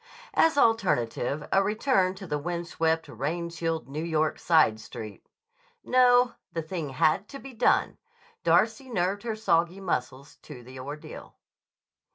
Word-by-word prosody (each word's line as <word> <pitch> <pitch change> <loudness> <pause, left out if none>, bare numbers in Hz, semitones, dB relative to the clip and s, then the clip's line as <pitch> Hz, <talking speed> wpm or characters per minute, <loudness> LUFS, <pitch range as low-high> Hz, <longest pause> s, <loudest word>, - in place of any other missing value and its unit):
As 320 -3 +3
alternative, 150 - +1
a 195 - +4
return 205 -2 +1
to 190 0 -9
the 150 -4 -2
wind 170 +2 -4
swept, 160 -1 0
rain 165 +8 -3
chilled 165 -1 -3
New 150 +4 -5
York 155 -2 0
side 155 -10 +3
street. 110 -2 -9 0.6
No; 250 -1 +4 0.2
the 165 - -3
thing 160 -2 -4
had 155 +8 +1
to 275 - -9
be 270 -1 -11
done! 235 +1 +2 0.4
Darcy 270 -2 +2
nerved 195 -2 -1
her 230 -2 -3
soggy 175 -3 +1
muscles 135 -6 -4
to 125 - -12
the 130 +2 -11
ordeal. 145 +4 -9
170 Hz, 145 wpm, -27 LUFS, 150-210 Hz, 0.6 s, a